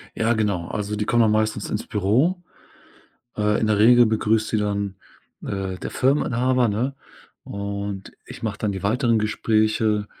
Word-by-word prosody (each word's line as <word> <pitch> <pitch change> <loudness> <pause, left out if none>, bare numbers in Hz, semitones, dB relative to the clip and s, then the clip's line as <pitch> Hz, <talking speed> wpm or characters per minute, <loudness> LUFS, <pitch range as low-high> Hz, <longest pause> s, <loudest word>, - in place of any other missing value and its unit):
Ja, 115 +1 +1
genau. 100 -6 -1
Also, 105 0 -3
die 105 0 -2
kommen 120 -1 +2
dann 110 - +3
meistens 110 -1 0
ins 105 - -3
Büro. 125 - +1 1.0
Äh, 105 0 +1
in 110 - +1
der 105 -1 +2
Regel 120 +2 +6
begrüßt 110 0 +1
sie 110 - 0
dann, 100 -2 -2 0.5
äh, 95 -1 -4
der - - -6
Firmeninhaber, 125 -2 +1
ne? 120 +7 -1 0.5
Und 100 -1 -5
ich - - -11
mache - - -3
dann 105 - -1
die 95 - -6
weiteren 115 +2 +2
Gespräche 110 0 +1
110 Hz, 160 wpm, -23 LUFS, 100-115 Hz, 1.0 s, Regel